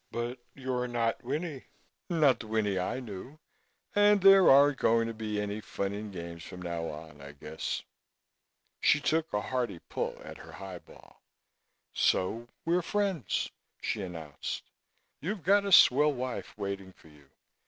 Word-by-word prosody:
But 120 +2 -4 0.2
you're 130 -2 -2
not 120 0 -1
Winnie 145 +2 -4 0.4
not 155 -7 +4
the 115 - -8
Winnie 105 -3 0
I 90 +7 -2
knew 125 +4 -8 0.6
and 205 0 +6
there 195 0 +8
aren't 140 0 +6
going 115 0 +3
to 115 - -4
be 110 -1 -3
any 105 +1 -3
fun 100 -1 -3
and 105 0 -6
games 85 -2 -7
from 90 - -9
now 85 -2 -3
on, 75 -1 -10
I 70 0 -10
guess." 75 +2 -4 1.0
She 145 - +5
took 160 +2 0
a 105 - +1
hearty 125 -6 -2
pull - - -4
at - - -10
her - - -12
highball. 95 -3 -11 0.7
"So 115 +6 +1 0.2
we're 175 +2 +2
friends," 190 - -1 0.3
she 105 - -2
announced. 80 -6 -6 0.5
"You've 190 +2 -3
got 200 +4 +4
a 200 - -2
swell 150 -3 +7
wife 130 -4 -5
waiting 100 -2 -5
for 80 - -19
you. 75 -2 -20
115 Hz, 155 wpm, -30 LUFS, 95-145 Hz, 1.0 s, there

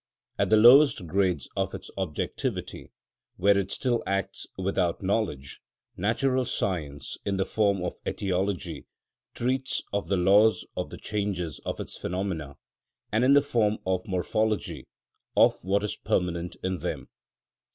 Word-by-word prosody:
At - - +2
the 110 - +6
lowest 120 -2 +7
grades 90 -4 0
of - - -1
its - - -9
objectivity, 95 -6 -3 0.5
where 100 +2 +4
it 100 -1 0
still 120 -3 0
acts 100 -1 -2
without 95 -2 0
knowledge, 95 -9 -1 0.3
natural 125 +6 +1
science, 80 -11 -3
in 100 -1 -1
the 95 - +1
form 100 -4 +1
of 90 - -2
etiology, 95 0 -2 0.5
treats 130 +2 -1
of 100 - -1
the 100 - +1
laws 100 +5 +4
of - - -3
the - - -8
changes 100 -7 -3
of - - -3
its - - -7
phenomena, 85 -7 -3 0.5
and, 110 +3 +2
in 135 +2 +6
the 145 0 +6
form 110 -6 +1
of 95 +2 -1
morphology, 95 -4 -1 0.5
of - - +4
what 100 +2 +1
is 105 - -3
permanent 85 -1 -1
in 95 -1 -1
them. - - -4
100 Hz, 140 wpm, -27 LUFS, 90-110 Hz, 0.5 s, lowest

